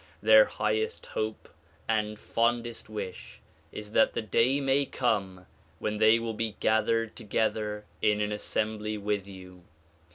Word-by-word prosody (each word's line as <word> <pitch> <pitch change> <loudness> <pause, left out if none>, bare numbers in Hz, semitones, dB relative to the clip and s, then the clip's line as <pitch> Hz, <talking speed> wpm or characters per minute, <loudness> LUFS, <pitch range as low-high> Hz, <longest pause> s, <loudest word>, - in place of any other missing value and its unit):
Their - - +8
highest 445 -1 -2
hope 110 0 -4 0.4
and 105 -1 0
fondest 120 +1 -1
wish 100 -4 -7 0.3
is 105 0 -7
that 110 - +4
the - - -1
day 120 +6 +2
may 135 0 +2
come 95 -7 -1 0.3
when 105 0 -3
they 110 +1 +6
will 115 -1 -3
be 110 0 -3
gathered 110 0 +1
together 105 -1 -2 0.2
in 105 0 +3
an 105 0 -1
assembly 105 0 -2
with 100 -1 -2
you. 90 -2 -12
110 Hz, 135 wpm, -28 LUFS, 105-115 Hz, 0.4 s, Their